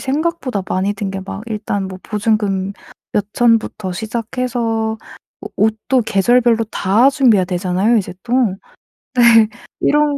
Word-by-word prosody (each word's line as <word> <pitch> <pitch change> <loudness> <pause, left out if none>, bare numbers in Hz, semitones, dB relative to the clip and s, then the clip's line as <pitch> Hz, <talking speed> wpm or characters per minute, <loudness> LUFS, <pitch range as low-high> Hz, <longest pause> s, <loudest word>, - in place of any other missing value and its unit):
생각보다 280 - -2
많이 190 +2 0
든 195 -1 -4
게 195 0 -5
막 195 +1 -7
일단 210 -3 -3
뭐 185 -1 -8
보증금 205 -3 -1 0.4
몇 205 -1 0
천부터 225 -5 +1
시작해서 225 +1 -2 0.5
오 - - -6
옷도 220 +4 +1
계절별로 230 +3 +3
다 220 +4 +2
준비해야 245 -9 +3
되잖아요 185 +5 +1
이제 195 -4 -2
또. 240 - -7 0.8
네. 235 -3 +6 0.3
이런 295 -1 +2
220 Hz, 265 characters per minute, -17 LUFS, 195-240 Hz, 0.8 s, 네